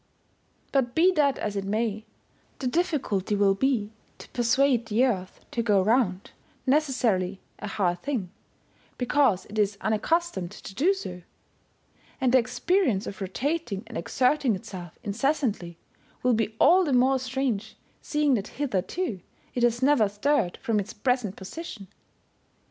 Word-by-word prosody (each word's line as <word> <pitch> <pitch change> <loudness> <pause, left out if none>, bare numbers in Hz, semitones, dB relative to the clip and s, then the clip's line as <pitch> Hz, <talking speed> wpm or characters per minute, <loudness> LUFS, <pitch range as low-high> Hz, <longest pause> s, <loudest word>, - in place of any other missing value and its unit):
But 255 -3 +1
be 355 +3 +5
that 290 -6 +2
as 210 -1 -3
it 200 - -1
may, 215 +1 -2 0.5
the 270 - -6
difficulty 250 - 0
will 200 -1 +4
be 220 -1 0 0.2
to - - -12
persuade 245 0 +2
the 225 +4 +3
Earth 190 -7 -3
to 235 - -1
go 210 -4 +3
round, 210 -3 +1 0.3
necessarily 250 -10 +1 0.2
a 210 - -5
hard 180 -3 0
thing, 240 -11 -3 0.7
because 250 -6 +2
it 215 +1 -5
is 205 -1 +1
unaccus 325 +12 +1
tomed 175 -2 -4
to 195 - -10
do 345 - +3
so; 180 - -7 1.0
and 260 -3 +2
the 260 - +7
experience 250 - +1
of 195 - -7
rotating 235 - -2
and - - -11
exerting 250 - +1
itself 185 -5 -9
incessantly 215 - -1 0.5
will 250 -1 +4
be 220 -1 0
all 370 +2 +6
the 290 -6 0
more 260 +2 +4
strange, 255 -4 -2 0.2
seeing 300 -2 +1
that 210 -4 0
hitherto 245 - -2 0.3
it 245 - -2
has 240 +1 +2
never 260 -7 +4
stirred 210 -2 0
from 225 -5 +1
its 200 +1 -5
present 235 -3 0
position. 200 - -8
235 Hz, 145 wpm, -26 LUFS, 200-275 Hz, 1.0 s, the